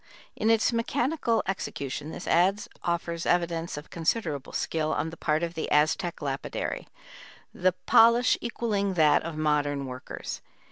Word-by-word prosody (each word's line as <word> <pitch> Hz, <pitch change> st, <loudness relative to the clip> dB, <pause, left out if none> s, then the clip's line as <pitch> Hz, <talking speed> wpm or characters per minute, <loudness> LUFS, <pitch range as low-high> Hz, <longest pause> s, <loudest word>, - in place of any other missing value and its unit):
In 220 Hz, -, +1 dB
its 225 Hz, +1 st, +3 dB
mechanical 235 Hz, 0 st, 0 dB
execution 150 Hz, -6 st, -4 dB
this -, -, -7 dB
adze 190 Hz, +4 st, +2 dB
offers 170 Hz, -1 st, -2 dB
evidence 170 Hz, -2 st, 0 dB
of 150 Hz, -, -9 dB
considerable 165 Hz, -, -1 dB
skill 155 Hz, -1 st, -1 dB
on 160 Hz, +2 st, -2 dB
the -, -, -8 dB
part 155 Hz, +1 st, 0 dB
of 170 Hz, 0 st, -2 dB
the 160 Hz, -, -3 dB
Aztec 155 Hz, +3 st, +1 dB
lapidary, 135 Hz, -1 st, -3 dB, 0.7 s
the 185 Hz, 0 st, +2 dB
polish 235 Hz, +2 st, +6 dB
equalling 210 Hz, -5 st, -1 dB
that 155 Hz, -3 st, +5 dB
of 160 Hz, -1 st, -6 dB
modern 145 Hz, -2 st, +1 dB
workers. 130 Hz, 0 st, -6 dB
170 Hz, 140 wpm, -27 LUFS, 150-205 Hz, 0.7 s, polish